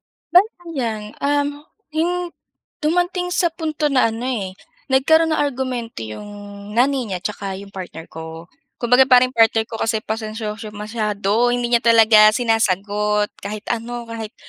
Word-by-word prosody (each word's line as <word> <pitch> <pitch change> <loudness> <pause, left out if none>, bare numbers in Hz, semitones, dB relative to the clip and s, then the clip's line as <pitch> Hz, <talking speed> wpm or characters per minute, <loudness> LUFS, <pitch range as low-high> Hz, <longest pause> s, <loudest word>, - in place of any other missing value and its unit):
Um, 290 - -1 0.3
'yong 350 +2 -1 0.5
dumating 355 +3 0
sa 350 - +2
punto 310 -2 -2
na 255 -4 +4
ano 225 +1 -6
eh, 210 -8 -2 0.4
nagkaroon 320 +5 +4
ng - - -1
argumento 250 - -4
'yong 205 - -8 0.5
nanay 260 -1 +2
niya 185 - -2
tsaka 200 -2 -4
'yong 200 0 -12
partner 175 -3 -8
ko. 160 +1 -9 0.3
Kumbaga, 250 +2 +4
parang 255 0 +5
partner 225 -2 +3
ko 225 0 -8
kasi 225 -1 0
pasensyoso 220 0 -5
masyado, 210 +1 0
hindi 245 0 -1
niya 235 - +5
talaga 225 -2 +7
sinasagot. 210 -2 +1
Kahit 210 +1 -6
ano, 235 +1 -3
kahit 225 -1 -7
230 Hz, 135 wpm, -20 LUFS, 210-270 Hz, 0.5 s, talaga